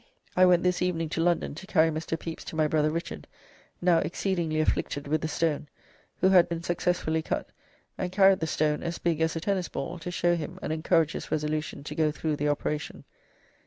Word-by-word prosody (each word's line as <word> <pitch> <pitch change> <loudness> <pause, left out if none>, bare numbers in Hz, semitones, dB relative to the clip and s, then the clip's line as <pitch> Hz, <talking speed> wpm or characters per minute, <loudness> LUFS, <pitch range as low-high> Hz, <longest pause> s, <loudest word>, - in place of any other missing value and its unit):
I 185 0 +6
went 180 -1 +4
this 180 0 +1
evening 165 -3 0
to 165 - -1
London, 175 -2 +1
to 185 +6 -10
carry 160 -3 +3
Mr. 160 +1 -3
Pepys 165 -1 -6
to - - -7
my 155 -1 +3
brother 155 0 +2
Richard, 165 +2 -5 0.6
now 175 -2 +5
exceedingly 170 -4 -1
afflicted 145 -2 -1
with 155 +1 0
the 160 - -1
stone, 155 -1 -1 0.5
who 190 - +5
had 180 -3 +6
been 170 -1 -3
successfully 175 -2 0
cut, - - -3 0.5
and 180 -1 -2
carried 190 0 +5
the 160 - -1
stone, 150 -1 0
as 170 0 -3
big 165 -2 0
as 160 0 +1
a - - -1
tennis 185 0 -1
ball, 170 +1 -5
to 165 - -6
show 175 0 +2
him 160 -3 -5
and 155 - -1
encourage 160 0 +2
his - - -6
resolution 150 -1 -2
to 145 - -6
go 155 0 +2
thro' 155 0 -2
the 145 0 0
operation." 145 0 -3
165 Hz, 205 wpm, -28 LUFS, 155-175 Hz, 0.6 s, I